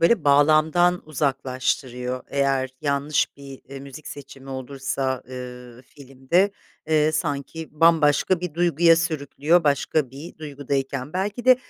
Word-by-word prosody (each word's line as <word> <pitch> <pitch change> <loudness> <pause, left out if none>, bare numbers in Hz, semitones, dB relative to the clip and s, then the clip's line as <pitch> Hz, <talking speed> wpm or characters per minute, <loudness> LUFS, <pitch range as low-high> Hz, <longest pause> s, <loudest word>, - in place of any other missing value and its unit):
böyle, 170 +2 +3
bağlamdan 155 +5 +4
uzaklaştırıyor 130 -3 -2
eğer 135 -2 0
yanlış 145 +1 0
bir, 140 -1 -11
eee, 135 0 -8
müzik 140 +2 -10
seçimi 135 -1 -10
olursa, 130 0 -3
ııı, 125 -1 -9
filmde. 140 +8 -1 0.4
Eee, 155 0 +3
sanki 155 +1 -3
bambaşka 165 +1 +4
bir 180 -4 -5
duyguya 170 -1 +4
sürüklüyor 160 0 +1
başka 145 -1 +1
bir 145 +6 -10
duygudayken. 140 -1 -3
Belki 205 +5 -3
de, 255 -1 +7
145 Hz, 120 wpm, -23 LUFS, 135-160 Hz, 0.4 s, de